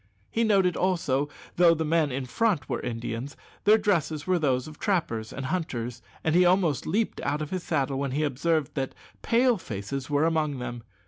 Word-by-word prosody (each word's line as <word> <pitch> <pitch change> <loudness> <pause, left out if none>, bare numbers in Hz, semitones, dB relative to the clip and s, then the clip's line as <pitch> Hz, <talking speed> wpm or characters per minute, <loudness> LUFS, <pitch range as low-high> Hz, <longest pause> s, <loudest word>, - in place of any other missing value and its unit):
He 230 - +1
noted 195 -5 +3
also 155 -7 +1
that, 145 - -22 0.2
though 170 -1 +7
the 160 0 -1
men 155 -2 +2
in 130 +1 -3
front 175 - 0
were - - -2
Indians, 120 +3 -4 0.3
their 215 +2 +7
dresses 165 -8 0
were 185 -1 +2
those 130 -4 +1
of 155 -1 -11
trappers 160 - -1
and 140 - -5
hunters, 130 -7 -3 0.2
and 160 - +1
he 180 +2 +6
almost 175 -7 +2
leaped 210 +7 0
out 145 +1 -1
of 150 - -7
his 185 -1 -2
saddle 135 -5 -1
when 140 -1 -1
he 150 +3 0
observed 150 +1 0
that 135 -2 -3 0.3
"Pale 240 -1 +3
faces" 130 - -5
were 145 +1 +2
among 155 -4 +1
them. 120 -1 -5
155 Hz, 195 wpm, -27 LUFS, 135-180 Hz, 0.3 s, though